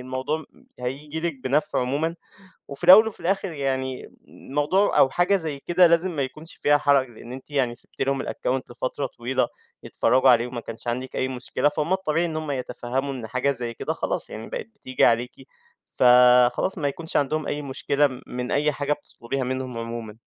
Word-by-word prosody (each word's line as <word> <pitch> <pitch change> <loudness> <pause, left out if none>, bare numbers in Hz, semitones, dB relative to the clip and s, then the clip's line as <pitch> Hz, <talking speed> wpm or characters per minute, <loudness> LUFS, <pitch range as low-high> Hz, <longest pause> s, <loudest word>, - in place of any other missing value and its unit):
الموضوع 130 +4 -3
م - - -23 0.2
هييجي 145 +5 -4
لِك 170 -1 -1
بنفْع 140 +2 +1
عمومًا، 145 +6 -1 0.5
وفي 140 +4 -9
الأول 190 +5 +9
وفي 220 - -7
الآخِر 195 +2 -1
يعني 130 -3 -3 0.2
الموضوع 150 +9 0
أو 135 - +6
حاجة 175 +7 +2
زي 155 -6 -3
كده 175 +4 +4
لازم 170 +2 +2
ما 145 - -1
يكونش 155 +5 -9
فيها 145 0 +3
حرَج 140 -3 +3
لأن 120 +1 -12
أنتِ 130 +3 -10
يعني 130 -4 0
سِبتِ - - -12
لهم 135 0 0
الaccount 130 +1 -2
لفترة 130 +3 -3
طويلة 125 +1 -1 0.4
يتفرّجوا 130 +1 +3
عليه 120 -1 +5
وما 120 -1 -6
كانش 115 +1 -9
عَندِك 125 +2 -3
أي 130 - 0
مشكلة، 130 +3 -1
فهُم 150 +4 -1
الطبيعي 170 -3 0
إن 160 -2 -3
هُم 155 -2 -3
يتفهّموا 130 +1 -3
إن 120 -4 -6
حاجة 130 +4 0
زي 120 -3 -5
كده - - -3
خلاص، - - -3
يعني 110 +1 -7
بقِت - - -5
بتيجي 130 -10 +1
عليكِ، 120 +1 +2 0.6
فخلاص، 125 +6 +5
ما 145 - 0
يكونش 160 +4 -3
عَندهم 150 +2 0
أي 150 - -2
مشكلة 140 +1 +1
م 130 -2 -9
من 125 0 -4
أي 150 +1 +2
حاجة 145 +1 0
بتطلبيها 135 -2 -5
منهم 130 -1 -3
عمومًا. 115 -2 -6
135 Hz, 185 wpm, -24 LUFS, 125-155 Hz, 0.6 s, الأول